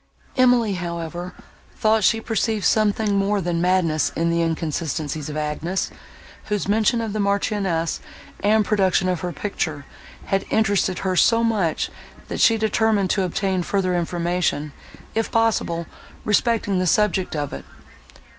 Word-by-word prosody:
Emily, 245 -5 +4
however, 175 0 -5 0.4
thought 220 -1 +2
she 225 +3 +4
perceived 220 -2 -1
something 215 -1 +2
more 200 +1 +1
than 175 -2 -1
madness 175 -4 +2
in 165 +1 +1
the 170 0 +1
inconsistencies 155 -2 -2
of 150 - -5
Agnes, 155 +5 -2 0.5
whose 210 -2 -2
mention 220 +3 +2
of 220 -3 -3
the 215 - -2
Marchioness, 200 -4 0 0.4
and 215 +1 +3
production 190 -3 +2
of 180 -2 0
her 180 - -3
picture, 155 -7 -3 0.4
had 195 0 0
interested 200 -4 +1
her 185 -1 +1
so 230 +5 +4
much, 205 -8 0 0.4
that - - -3
she 225 - +5
determined 220 -3 +1
to 200 - +1
obtain 190 +1 0
further 185 0 0
information, 170 -3 -1 0.4
if 225 0 -1
possible, 215 -7 +1 0.4
respecting 210 -2 +1
the 185 - 0
subject 190 -2 +1
of 145 -2 -3
it. 70 - -6
190 Hz, 140 wpm, -22 LUFS, 170-215 Hz, 0.5 s, she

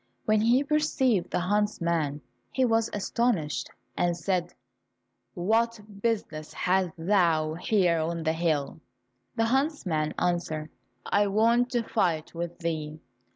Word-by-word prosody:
When 215 0 +3
he 240 +5 +4
perceived 280 - +1
the - - -1
huntsman, 170 -7 0 0.3
he 260 - +2
was 225 -1 +2
astonished 205 -6 -1 0.3
and 175 -1 +1
said, 175 -1 -1 0.8
"What 225 +5 +1 0.2
business 200 -9 -2
hast 185 -2 +1
thou 165 -3 +2
here 175 -1 +2
on 165 +1 -2
the 160 0 +1
hill?" 160 -3 -1 0.5
The 225 - +2
huntsman 225 - 0
answered, 170 -3 -1 0.3
"I 205 0 +2
want 230 +4 +3
to 240 -1 +1
fight 165 -7 0
with 170 0 -5
thee." 155 -2 -3
180 Hz, 120 wpm, -27 LUFS, 165-225 Hz, 0.8 s, he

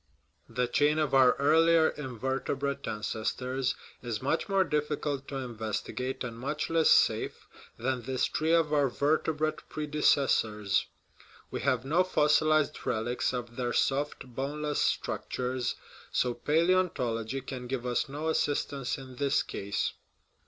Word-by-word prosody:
The 125 0 0
chain 145 +4 +2
of 150 -3 0
our 130 -2 +6
earlier 160 +3 +4
invertebrate 135 +1 -3
ancestors 125 +5 -2 0.3
is 120 -4 -3
much 160 - -1
more 195 -1 +4
difficult 150 -3 -2
to 140 - -6
investigate 125 +1 -3
and 115 -2 -6
much 150 +5 -3
less 165 -1 +4
safe - - +3 0.3
than 125 +1 -1
this 130 +1 0
tree 160 +1 0
of 160 -2 +2
our 145 -2 +3
vertebrate 155 +3 0
predecessors; 135 -9 +1 0.6
we - - -3
have 125 0 +1
no 165 +7 +3
fossilized 155 -3 +2
relics 120 +2 -1
of 120 -2 -5
their 120 -1 -1
soft, 140 0 0
boneless 145 +4 -2
structures, 125 -1 -1 0.4
so 125 -1 +1
palaeontology 135 -6 +1
can 125 -2 -6
give 125 -1 -3
us 125 +2 0
no 150 +3 -4
assistance 145 -4 0
in 130 -2 -11
this 140 0 +2
case. 100 +1 -2
135 Hz, 130 wpm, -29 LUFS, 125-150 Hz, 0.6 s, our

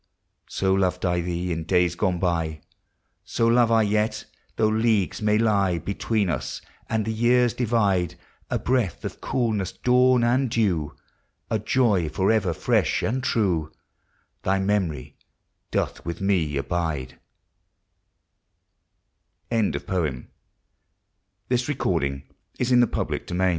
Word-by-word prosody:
So 95 0 +1
loved 95 -1 0
I 90 -1 +1
thee 90 +1 -3
in 80 -1 -2
days 90 0 +2
gone 90 0 0
by, 80 -4 -1 0.6
So 115 - -1
love 115 0 +4
I 115 -1 +4
yet, 105 +1 0 0.3
though 110 - +2
Leagues 110 -5 +1
may 105 0 +3
lie 100 -5 +2
Between 100 +3 -1
us, 75 -7 -3 0.3
and 110 -2 0
the 110 - -2
years 120 +1 +3
divide; 100 -8 +1 0.3
A - - 0
breath 125 -7 -1
of - - -6
coolness, 110 -7 -1
dawn, 125 0 +3
and 125 +2 +2
dew, 90 -10 0 0.6
A 110 - +1
joy 105 -7 +2
forever 95 +3 +1
fresh 80 - +1
and 130 +3 -1
true, 90 - 0 0.7
Thy 95 +1 +1
memory 95 -9 -1 0.5
doth - - -2
with 85 +1 -5
me 90 -7 +1
abide 70 -5 -3 2.3
ANNA 115 -3 +1
BOYNTON 80 -10 -3 1.2
AVERILU 120 - -1
SON 95 +1 +1
100 Hz, 115 wpm, -24 LUFS, 85-115 Hz, 2.3 s, love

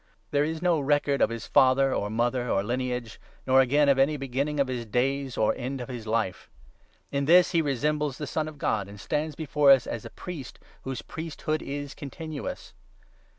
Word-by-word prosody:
There 145 0 +3
is 160 +1 -3
3 - - -4
no 170 -3 +3
record 145 0 +1
of - - +4
his 115 -1 -5
father, 135 +1 +4
or 100 - -1
mother, 120 +2 0
or 95 - +1
lineage, 125 0 -3 0.3
nor 130 0 +6
again 145 +3 +3
of 140 -1 +4
any 145 +3 +3
beginning 140 +2 -2
of 140 - +3
his 125 -2 -3
days, 135 +3 -1
or 110 - +3
end 130 +2 -4
of 125 - -6
his 120 -3 -6
life. 110 -4 -1 0.6
In 140 0 0
this 175 +4 +6
he 170 -3 +3
resembles 150 0 -1
the 150 - -4
Son 155 +1 -2
of 155 -1 -9
God, 105 -7 -1
and 100 0 -11
stands 150 +6 -2
before 150 -2 +2
us 135 -3 +7
as 115 - -5
a - - -8
priest 170 -8 -8 0.2
whose 130 -2 -5
priesthood 155 -1 -4
is 145 0 -5
continuous. 155 +1 -7
135 Hz, 195 wpm, -27 LUFS, 125-150 Hz, 0.6 s, us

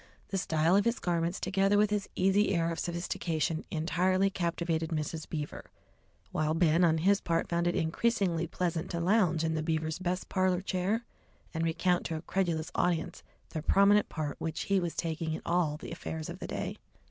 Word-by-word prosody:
The 195 - -1
style 160 +1 +2
of 200 - +4
his 235 +1 +2
garments, 170 0 -1
together 195 +2 +2
with 210 0 +3
his 205 -2 -1
easy 195 +2 +3
air 165 0 +1
of 165 - -4
sophistication, 170 -2 -2
entirely 185 +4 +1
captivated 170 -3 -1
Mrs. 155 0 -3
Beaver, 150 -2 -5 0.6
while 155 0 0
Ben 165 +1 +4
on 160 -2 +4
his 195 +5 +3
part 165 -1 0
found 170 0 0
it 175 - +1
increasingly 175 0 +1
pleasant 175 0 -2
to 170 - -2
lounge 175 -3 +3
in 160 0 0
the 160 - -1
Beavers' 160 0 -1
best 185 0 -2
parlour 185 -1 +1
chair 195 +5 -1 0.5
and 165 0 -1
recount 175 +2 +1
to 165 - -3
a 155 - -5
credulous 170 -5 -1
audience 175 -1 0 0.3
the 155 - -4
prominent 200 +5 +4
part 150 -3 -4
which 160 -1 -2
he 200 -1 +2
was 175 -2 -3
taking 160 -1 -2
in - - -4
all 170 -3 +1
the - - -9
affairs 160 -1 -5
of 175 +2 -7
the - - -5
day. - - -4
170 Hz, 185 wpm, -30 LUFS, 160-185 Hz, 0.6 s, of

